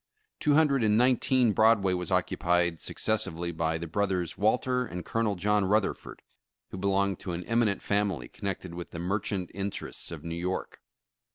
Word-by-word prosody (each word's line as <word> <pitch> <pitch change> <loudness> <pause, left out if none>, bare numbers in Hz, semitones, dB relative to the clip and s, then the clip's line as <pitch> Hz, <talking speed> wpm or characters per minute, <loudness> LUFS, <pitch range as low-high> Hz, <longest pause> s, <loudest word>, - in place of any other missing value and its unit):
Two 145 -1 +3
hundred 145 -5 +4
and 105 0 +3
nineteen 125 -1 +3
Broadway 105 -3 +4
was 90 -2 -3
occupied 85 -1 +1
successively 85 -6 -1
by 80 0 -1
the 85 - -5
brothers, 90 0 -1
Walter, 125 +4 +1
and 90 -6 -6
Colonel 115 -3 0
John 105 +2 +1
Rutherford, 105 +1 -1 0.5
who - - -6
belonged 100 -1 +1
to 90 - -5
an 85 +1 -4
eminent 115 -4 +1
family 100 -11 0
connected 95 -3 -5
with 85 0 -7
the - - -8
mer 90 +5 -1
chant 95 -3 -3
interests 100 +1 -4
of - - -7
New 85 - -4
York. 90 +2 -4
100 Hz, 165 wpm, -28 LUFS, 90-110 Hz, 0.5 s, hundred